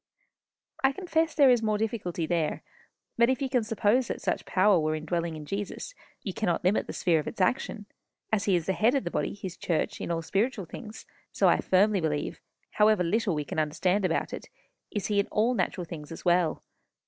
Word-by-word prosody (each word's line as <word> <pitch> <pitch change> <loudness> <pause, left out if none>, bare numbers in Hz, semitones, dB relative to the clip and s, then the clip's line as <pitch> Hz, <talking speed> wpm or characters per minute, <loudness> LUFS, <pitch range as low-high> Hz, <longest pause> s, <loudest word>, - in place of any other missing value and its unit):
"I 270 0 +4
confess 325 -1 0
there 275 -4 +6
is 245 -2 +3
more 215 -1 +1
difficulty 210 -6 -2
there. 160 -2 -1 0.6
But 235 +1 +5
if 260 - +1
you 275 - -1
can 255 -3 +1
suppose 225 +3 +2
that - - -3
such - - -2
power 190 -1 +4
were 155 0 0
indwelling 165 +1 -2
in 155 -1 -8
Jesus, 200 - -5 0.3
you 195 - -4
cannot 180 -5 -1
limit 185 +4 +2
the - - -5
sphere 170 -3 +2
of 150 - -5
its - - -6
action. 210 +1 0 0.5
As 205 -2 +2
he 195 - +3
is 170 -2 0
the 190 - +1
head 230 +7 +3
of 275 - +1
the - - -4
body, - - -2
his 190 -3 -7
church, 165 -3 -2
in - - -4
all 165 -1 -1
spiritual 205 +3 0
things, 215 +6 -9 0.3
so - - +2
I - - +5
firmly 195 +1 +3
believe, 150 -2 -2 0.3
however 210 -3 +4
little 200 +1 +1
we 150 -1 -2
can 155 - -3
understand 180 +6 +1
about 180 -3 0
it, - - -7 0.4
is 205 - -3
he 205 -1 +1
in 200 - +1
all 225 +4 +1
natural 185 -6 -1
things 155 -3 -9
as 165 - -9
well. 175 -2 +2
195 Hz, 210 wpm, -28 LUFS, 170-220 Hz, 0.6 s, there